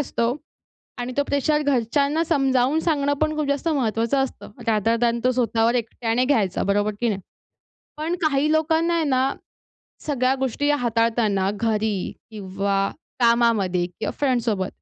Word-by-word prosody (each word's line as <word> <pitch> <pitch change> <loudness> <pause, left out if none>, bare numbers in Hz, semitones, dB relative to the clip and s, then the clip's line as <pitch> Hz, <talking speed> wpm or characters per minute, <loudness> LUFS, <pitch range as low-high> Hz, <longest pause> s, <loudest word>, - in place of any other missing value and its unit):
असतो 245 -2 -1 0.6
आणि 245 +1 -4
तो 285 - +3
प्रेशर 300 +2 +1
घरच्यांना 280 +3 +1
समजावून 270 -2 +2
सांगणं 285 -4 +1
पण 310 0 +1
खूप 305 - -1
जास्त 280 +3 0
महत्त्वाचं 235 -3 0
असतं 270 -1 -3 0.2
रादर 225 +1 +2
दयान 235 0 +1
तो 255 - +4
स्वताःवर 235 -1 +1
एकट्याने 235 +1 -1
घ्यायचा 215 -10 +1
बरोबर 205 +2 +1
की 240 - +1
नाही. 200 -3 -2 0.8
पण 315 +3 -2
काही 300 -1 +2
लोकांना 320 +2 +2
आहे 330 -1 +1
ना, 265 -1 +1 0.7
सगळ्या 265 -3 +1
गोष्टी 265 +3 0
हाताळताना 230 -6 +1
घरी 215 -3 -1 0.2
किंवा 195 -1 -1 0.3
कामामध्ये 230 -7 +3
किंवा 175 - -5
फ्रेंन्डसोबत 235 -8 0
245 Hz, 140 wpm, -23 LUFS, 220-285 Hz, 0.8 s, तो